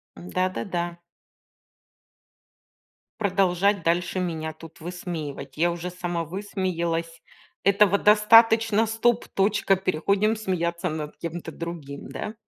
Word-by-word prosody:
Да, 90 - -1
да, 185 - -4
да. 175 -3 -3 2.2
Продолжать 195 -1 +2
дальше 175 +3 0
меня 160 -3 -3
тут 160 0 -13
высмеивать. 160 -6 -6
Я 170 +2 +3
уже 175 +1 -4
сама 175 -1 -3
высмеялась, 170 -3 -3 0.4
этого 200 0 +4
достаточно. 225 +1 +5
Стоп, 225 +2 +1
точка. 195 0 +2
Переходим 195 +4 +1
смеяться 180 -4 -2
над 155 -1 -5
кем-то 170 -1 -6
другим, 160 -4 -7
да? 215 - -5
180 Hz, 105 wpm, -25 LUFS, 165-200 Hz, 2.2 s, достаточно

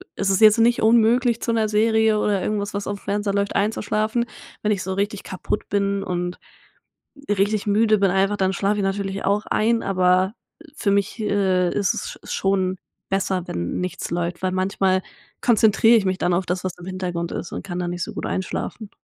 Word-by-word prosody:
es 195 -1 0
ist 195 - +2
jetzt 215 +1 +7
nicht 235 +1 +3
unmöglich 235 +2 +3
zu - - -1
'ner 225 -2 +1
Serie 220 0 +3
oder 205 -3 +1
irgendwas, 210 -1 -2
was 200 0 -4
auf 200 -1 -3
dem - - -22
Fernseher 205 0 -1
läuft 200 0 -1
einzuschlafen. 215 +3 0 0.4
Wenn 210 - 0
ich 200 -3 0
so 190 +1 -3
richtig 200 +1 -2
kaputt 185 +2 -4
bin 200 -1 0
und 180 -1 -3 0.9
richtig 205 +1 +1
müde 215 +1 +3
bin 195 -2 +3
einfach, 195 +2 +1
dann 190 0 +1
schlafe 200 +2 0
ich - - 0
natürlich 195 0 -2
auch 205 +2 +1
ein, 230 +1 +1
aber 185 +1 +2 0.4
für 215 -10 -1
mich, 200 +3 0
äh, 190 -4 +1
ist 205 -1 0
es 470 +2 -4
sch - - -11
schon 190 -1 0 0.3
besser, 190 -2 -1
wenn 85 0 -3
nichts 180 0 -4
läuft, 170 +1 -3
weil 185 - +1
manchmal 185 0 +1 0.4
konzentriere 225 0 +5
ich 210 - +2
mich 185 0 0
dann 175 - +1
auf 185 +2 0
das, 180 +1 -2
was 185 - -3
im 180 - -11
Hintergrund 180 -2 -3
ist - - -5
und - - -5
kann 175 -2 -5
da 180 - -2
nicht 175 0 -4
so - - -4
gut - - -4
einschlafen. 200 +3 -4
200 Hz, 200 wpm, -22 LUFS, 185-215 Hz, 0.9 s, jetzt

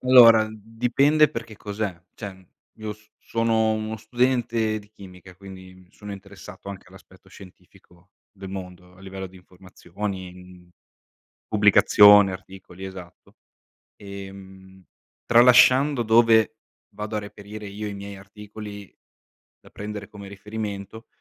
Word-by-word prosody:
Allora 115 -4 +7
dipende 125 +8 +2
perché 115 -5 -7
cos'è, 105 -3 -4 0.2
cioè 95 -4 -9 0.3
io 110 -1 -5
s 105 0 -20
sono 115 -1 +1
uno 110 0 -3
studente 115 -1 0
di 105 -1 -16
chimica, 95 -3 -14
quindi 95 -1 -12
mi 90 -1 -20
sono 105 -1 -9
interessato 100 0 -11
anche 100 - -11
all'aspetto - - -18
scientifico 90 -1 -18 0.2
del 95 -1 -10
mondo, 90 -1 -9
a 95 - -19
livello 95 0 -7
di 95 - -17
informazioni, 95 +1 -8
mhmm, 90 -1 -15 0.8
pubblicazione, 105 -1 +6
articoli, 95 0 -11
esatto. 95 -3 -11 0.6
Ehm, 95 -1 -11 0.4
tralasciando 125 +3 +6
dove 110 -1 +4 0.4
vado 105 +1 -5
a - - 0
reperire 105 0 -10
io 105 +2 -6
i 105 - -5
miei 100 0 -8
articoli 105 0 -11 0.7
da - - -18
prendere 105 0 -7
come 100 -1 -11
riferimento, 105 +1 -7
100 Hz, 120 wpm, -24 LUFS, 95-110 Hz, 0.8 s, Allora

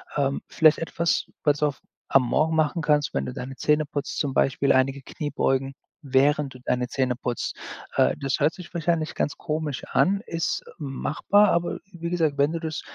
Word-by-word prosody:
Ähm, 140 -1 +1
vielleicht 155 -1 +4
etwas, 165 0 0 0.2
was 145 -1 +3
du 150 - +1
auf 145 - -3 0.3
am 135 - +4
Morgen 160 +6 +1
machen 160 +2 +1
kannst, 150 -1 +2
wenn - - -1
du 125 - -5
deine 130 +1 -6
Zähne 150 +3 +2
putzt, 145 -1 -4
zum 140 -3 -1
Beispiel 135 +1 +2
einige 135 +1 +2
Kniebeugen, 135 -1 -1 0.3
während 140 0 +2
du 130 - -12
deine 125 -1 0
Zähne 130 -2 -1
putzt. 125 -2 -3 0.4
Äh, - - +4
das 135 -1 -1
hört 150 +3 +3
sich 180 -2 -11
wahrscheinlich 165 -2 0
ganz 145 - -1
komisch 155 -3 -3
an, 200 +2 +3
ist 165 -1 -2
machbar, 155 +8 +2
aber 170 0 0
wie 170 -1 -5
gesagt, 160 -5 0
wenn 145 +3 +2
du 165 - -2
das 160 -1 -4
150 Hz, 185 wpm, -25 LUFS, 135-160 Hz, 0.4 s, vielleicht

